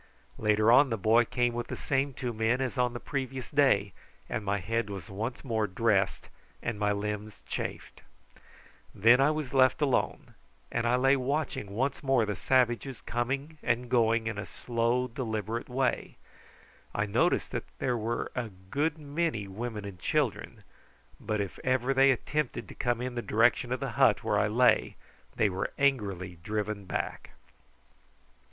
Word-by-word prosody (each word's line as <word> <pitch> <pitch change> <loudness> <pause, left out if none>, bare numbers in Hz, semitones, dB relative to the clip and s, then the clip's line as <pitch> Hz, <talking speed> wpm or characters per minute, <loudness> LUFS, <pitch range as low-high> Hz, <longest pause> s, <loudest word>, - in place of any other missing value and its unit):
Later 105 +1 +3
on 130 +3 +6
the 115 - -1
boy 110 +4 +4
came 120 0 0
with 120 0 -3
the - - -4
same 135 -1 -1
two 125 -2 -3
men 110 +3 +1
as 130 -2 -2
on 125 -1 +1
the 120 - -5
previous 130 -1 -4
day, 115 -10 +3 0.3
and 110 - -3
my 100 0 0
head 115 +3 -2
was 95 -4 -7
once 110 +6 -4
more 110 -4 0
dressed 100 0 +1 0.4
and 115 -3 -3
my 105 0 +2
limbs 105 +1 -4
chafed. - - -5 0.9
Then 120 +6 +6
I 140 - +5
was 155 -4 -3
left 130 -1 +4
alone, 145 -4 0 0.4
and 115 0 0
I 120 - +3
lay 135 +2 +4
watching 140 -5 -2
once 135 +4 -1
more 135 -5 +2
the 105 -1 -2
savages 125 +3 +1
coming 135 +6 -3
and 120 +1 -1
going 115 -2 +3
in 110 -2 -3
a 105 - -5
slow 120 +1 0
deliberate 115 -2 -4
way. 125 0 -1 0.8
I 105 - +1
noticed 100 - +1
that - - -3
there 125 -2 0
were 115 +1 -2
a 125 -3 -3 0.2
good 150 +2 0
many 145 -7 -2
women 105 +1 -5
and 95 -3 -8
children, - - -1 0.6
but 105 -1 -2
if 100 -2 -4
ever 130 +1 +1
they 135 +1 +5
attempted 145 +1 -1
to - - -8
come 120 -1 -1
in 125 0 -3
the 120 - -2
direction 120 +2 +2
of 130 - 0
the - - -3
hut - - +3
where - - +1
I 105 - +2
lay 120 +4 +3 0.4
they 110 - +3
were 95 -1 -2
angrily 100 -11 0
driven 105 0 -3
back. - - -4
120 Hz, 165 wpm, -29 LUFS, 105-130 Hz, 0.9 s, on